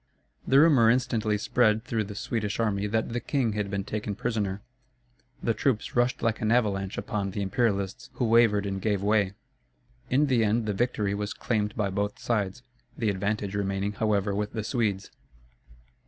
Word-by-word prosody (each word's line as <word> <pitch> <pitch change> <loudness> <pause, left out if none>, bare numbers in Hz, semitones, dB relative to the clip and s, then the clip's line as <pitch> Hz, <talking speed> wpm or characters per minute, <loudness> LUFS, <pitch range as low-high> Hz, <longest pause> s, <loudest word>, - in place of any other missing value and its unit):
The 135 - +6
rumor 140 -8 +6
instantly 115 -4 +1
spread 110 0 +2
through 115 -3 -1
the 100 0 -8
Swedish 105 0 -2
army 105 -3 0
that 110 +2 0
the 120 - 0
king 125 -4 0
had 105 -1 -2
been 100 0 -2
taken 105 0 -4
prisoner. 105 -4 -2 0.8
The 115 - +2
troops 110 0 -1
rushed 120 +1 +1
like 115 -1 0
an 110 0 +1
avalanche 100 -5 +1
upon 100 -2 -2
the 100 +1 -3
Imperialists, 100 -2 -1
who 125 - -1
wavered 110 -3 +4
and 95 -1 -3
gave 100 -2 0
way. 100 -2 +2 0.8
In 140 +4 +3
the 125 -5 +2
end 110 +2 +1
the 105 - -1
victory 105 -2 0
was 105 +1 -3
claimed 105 -3 -1
by 100 -3 -1
both 100 +2 -2
sides, 105 0 -2 0.3
the 110 -3 +1
advantage 100 +1 -2
remaining 100 0 -1
however 105 -1 0
with 105 +1 -2
the 110 -2 -3
Swedes. 105 -5 -1
105 Hz, 170 wpm, -27 LUFS, 100-115 Hz, 0.8 s, The